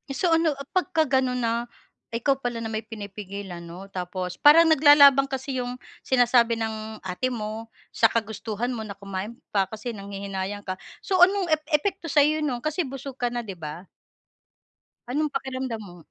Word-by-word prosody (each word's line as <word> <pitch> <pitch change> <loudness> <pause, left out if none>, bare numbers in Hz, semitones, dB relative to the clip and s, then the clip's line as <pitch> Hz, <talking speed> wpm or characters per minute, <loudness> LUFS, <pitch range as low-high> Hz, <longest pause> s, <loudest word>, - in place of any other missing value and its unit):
So 340 +4 +1
ano 325 -3 +3
a 275 - -7
pagkaganon 285 -9 +1
na 235 +1 0 0.5
ikaw 270 +3 +1
pala 240 -3 -3
na 225 - -4
may 220 - -1
pinipigilan 200 -4 -7
'no, 175 +3 -10
tapos 180 0 -4
parang 300 +3 +8
naglalaban 285 -2 +7
kasi 265 -1 -3
'yung 245 0 -3 0.2
sinasabi 240 -2 +3
ng 220 -1 -5
ate 185 +7 -2
mo, 225 -2 -5 0.2
sa 225 - +4
kagustuhan 220 +1 -3
mo 220 -3 -5
na 200 - -7
kumain 200 +3 -6 0.2
pa, 195 -2 +2
kasi 220 +3 -6
nanghihinayang 200 -1 -5
ka. 185 -1 -5 0.2
So 375 -2 0
anong 370 -1 +5
ep 310 - +4
epekto 340 +3 0
sa'yo 300 +1 +3
no'n, 260 -6 -2
kasi 310 0 -1
busog 270 0 -8
ka 245 - +1
na, 240 0 -3
'di 195 -5 -8
ba? 160 +4 -7 1.2
Anong 295 +4 -1
pakiramdam 260 -3 -3
mo? 180 -4 -11
235 Hz, 165 wpm, -25 LUFS, 200-275 Hz, 1.2 s, parang